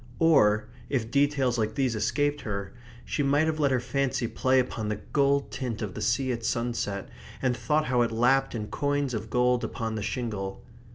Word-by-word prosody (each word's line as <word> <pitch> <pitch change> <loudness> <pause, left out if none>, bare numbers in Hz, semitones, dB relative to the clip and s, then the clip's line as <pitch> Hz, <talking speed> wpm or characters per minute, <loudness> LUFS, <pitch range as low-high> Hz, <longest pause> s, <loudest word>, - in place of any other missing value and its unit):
Or, 110 -10 +4 0.2
if 120 -5 -1
details 140 -3 +2
like 110 -1 -1
these 130 -4 +1
escaped 145 +6 0
her, 100 -4 -4 0.3
she - - -1
might 145 +2 +3
have 160 -1 -1
let 145 -2 +3
her 130 -1 +2
fancy 130 0 -1
play 130 +3 +2
upon 115 -4 -2
the 105 - 0
gold 140 +6 +1
tint 125 -4 -4
of 100 -3 -4
the 110 - -6
sea 120 +4 +1
at 115 -1 -3
sunset, 115 -5 -2 0.3
and 125 -2 +1
thought 155 +4 +1
how 125 -2 +2
it 115 - +1
lapped 125 +4 +2
in 105 -2 -4
coins 145 -2 -1
of 110 0 -4
gold 125 +1 +2
upon 110 -1 -3
the 110 - -3
shingle. 100 -4 -4
125 Hz, 190 wpm, -27 LUFS, 110-140 Hz, 0.3 s, Or